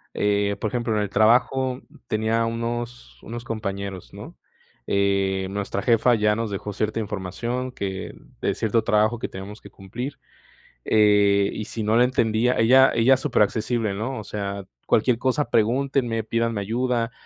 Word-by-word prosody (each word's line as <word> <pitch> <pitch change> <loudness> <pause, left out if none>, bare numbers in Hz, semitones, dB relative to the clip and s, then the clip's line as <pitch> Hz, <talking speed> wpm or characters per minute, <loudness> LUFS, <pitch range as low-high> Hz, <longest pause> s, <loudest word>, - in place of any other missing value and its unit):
Eh, 100 0 +1
por 110 - -1
ejemplo, 120 -2 -1
en 105 - +1
el 100 - -4
trabajo 125 +4 +2 0.3
tenía 110 +1 0
unos 115 - -5
unos 120 +2 -7
compañeros, 100 -5 -5
¿no?, - - -10 0.5
eh, 100 -1 +1
nuestra 100 0 -3
jefa 120 0 +3
ya 105 -2 +2
nos 115 -2 -3
dejó 100 +1 -4
cierta 110 +2 -2
información 110 +5 -4
que 95 -5 -5 0.3
de - - 0
cierto 110 0 0
trabajo 110 +2 +2
que - - -4
tenemos 100 +3 -9
que - - -14
cumplir, 120 +8 -7 0.7
eh, 105 -2 +4
y 110 - -5
si 115 -1 -5
no 110 +2 +2
le 125 - +6
entendía 120 -1 +1
ella 130 +4 +6
ella 125 +3 +5
es - - -4
supera 135 -6 +2
accesible, 110 -1 -2
¿no? 115 +6 -4
O 105 - -7
sea, 100 -1 -5 0.2
cualquier 115 +1 +3
cosa 130 +3 0
pregúntenme, 120 0 +1
pídanme 115 -1 -1
ayuda, 120 +2 -1
110 Hz, 160 wpm, -23 LUFS, 100-120 Hz, 0.7 s, le